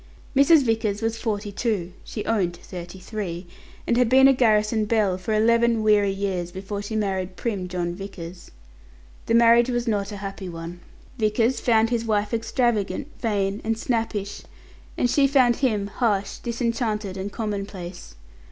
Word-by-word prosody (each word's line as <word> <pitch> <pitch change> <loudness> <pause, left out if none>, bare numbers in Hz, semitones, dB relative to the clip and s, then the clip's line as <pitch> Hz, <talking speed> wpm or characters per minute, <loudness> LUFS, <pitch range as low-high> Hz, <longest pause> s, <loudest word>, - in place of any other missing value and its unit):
Mrs. 280 +2 +6
Vickers 225 -3 0
was 225 0 -1
forty 210 -3 -2
two 200 -5 -2
(she 210 - -6
owned 190 -6 0
to - - -18
thirty 180 0 -8
three), 185 -3 -5 0.4
and 235 - +1
had 250 -2 +3
been 265 +2 +7
a 270 - +6
garrison 215 -3 +2
belle 210 -4 +2
for 185 +4 -5
eleven 230 +1 +3
weary 210 -2 +4
years 195 -3 -2
before 200 +2 -5
she 205 +2 -5
married 190 -3 -2
prim 200 -5 -3
John 175 -1 -2
Vickers. 180 -2 -9 0.8
The 230 - +3
marriage 235 +1 +6
was 240 -1 -1
not 205 -2 0
a 205 - -6
happy 195 -1 -6
one. 170 +1 -7 0.4
Vickers 225 +3 +2
found 225 -1 +3
his 235 -1 0
wife 210 -1 0
extravagant, 235 +2 0
vain, 205 -3 -1
and 225 0 -1
snappish, 225 -4 -2 0.6
and 245 - +2
she 275 +3 +3
found 255 -4 +4
him 220 -7 +1
harsh, 200 -1 -1
disenchanted, 230 -4 -2
and 195 +1 -4
commonplace. 195 -5 -5
210 Hz, 160 wpm, -24 LUFS, 195-230 Hz, 0.8 s, been